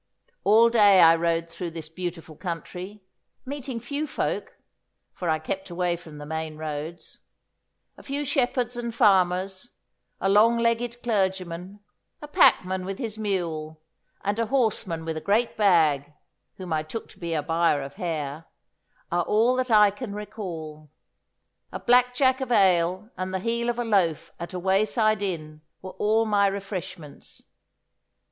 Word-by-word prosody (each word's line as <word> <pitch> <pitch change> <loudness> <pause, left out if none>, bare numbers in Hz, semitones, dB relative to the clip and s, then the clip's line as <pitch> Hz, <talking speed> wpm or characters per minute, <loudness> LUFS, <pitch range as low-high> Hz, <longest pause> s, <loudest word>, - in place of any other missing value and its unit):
All 225 +3 +6
day 205 -4 +6
I 165 -1 +8
rode 165 0 0
through 170 +1 -6
this 165 -1 -8
beautiful 165 -1 -6
country, 180 +4 -6 0.4
meeting 265 -3 -5
few 285 +6 -3
folk, - - -3 0.6
for 175 - -4
I 160 - +2
kept 190 +5 -5
away 175 0 0
from 160 -3 -12
the 145 - -8
main 160 0 -4
roads. 155 +2 -6 0.8
A - - -12
few 285 +1 -3
shepherds 250 -3 0
and 235 -1 -4
farmers, 190 -1 +2 0.5
a - - 0
long 215 +4 +5
legged 235 +1 0
clergyman, 190 -3 -2 0.4
a 295 - -9
packman 190 -9 +3
with 195 +1 -5
his 220 -3 -5
mule, 165 -7 -3 0.4
and 205 +2 -1
a 230 - 0
horseman 210 -10 0
with 160 -1 -3
a - - -4
great 220 +6 +1
bag, 155 -8 +3 0.5
whom 185 -3 -5
I 155 - +1
took 185 +9 -7
to - - -17
be 170 -2 -3
a 150 - -1
buyer 165 -2 +1
of 140 +1 -10
hair, 155 -3 -4 0.7
are 175 +1 +2
all 230 +4 +3
that 255 0 -1
I 210 -2 +6
can 205 0 -7
recall. 170 -8 -7 0.8
A - - -5
black 250 0 +3
jack 260 0 +3
of 260 -2 -3
ale 185 0 +3
and 185 0 -3
the 190 - -1
heel 235 +3 -1
of 240 - -1
a 240 - -1
loaf 185 -8 +1
at 170 - -6
a 185 - -5
wayside 215 +3 +2
inn 155 -6 -4 0.2
were 185 - -8
all 220 +3 +1
my 205 -2 +3
refreshments. 190 -5 -7
190 Hz, 155 wpm, -25 LUFS, 165-225 Hz, 0.8 s, I